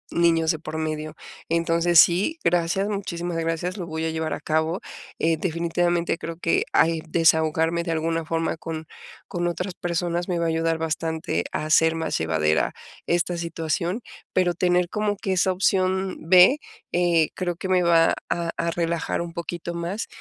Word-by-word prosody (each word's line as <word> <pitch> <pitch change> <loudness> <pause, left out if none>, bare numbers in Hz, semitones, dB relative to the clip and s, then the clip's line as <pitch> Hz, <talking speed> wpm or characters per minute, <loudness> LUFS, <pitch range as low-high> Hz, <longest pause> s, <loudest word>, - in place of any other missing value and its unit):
niños 165 -1 +3
de 160 - -4
por 155 0 -6
medio. 155 0 -3 0.3
Entonces, 165 +1 +3
sí, 190 - +4
gracias, 175 +3 +1
muchísimas 175 -4 -3
gracias, 165 +3 -2
lo 175 -3 -5
voy 160 0 -3
a 160 - -1
llevar 160 0 -2
a - - -5
cabo, 160 +3 0 0.4
eh, 165 0 +1
definitivamente 170 0 0
creo 165 - -5
que 165 - +1
al 165 0 +3
desahogarme 160 0 +2
de 170 - -3
alguna 165 +1 -1
forma 165 +1 -1
con 160 0 -6 0.4
con 175 0 -2
otras 180 +2 -3
personas 175 0 -2
me 175 - 0
va 170 - 0
a - - +1
ayudar 165 0 0
bastante 160 0 -2
a - - -3
hacer 160 +1 +4
más 160 -1 -2
llevadera 80 -1 +1 0.3
esta 175 +1 +1
situación, 170 +4 -2 0.3
pero 180 -1 +2
tener 180 0 +1
como 210 0 -1
que 190 0 -2
esa 185 +1 +2
opción 190 0 +1
B, 185 +9 +7 0.3
eh, 175 -3 +2
creo 175 -2 -2
que 190 +2 -6
me 185 -1 +4
va 170 -1 +4 0.2
a 170 -1 -1
a 170 - 0
relajar 170 -1 -1
un 170 -1 -6
poquito 170 +1 -5
más 170 +5 -3
170 Hz, 170 wpm, -24 LUFS, 160-175 Hz, 0.4 s, B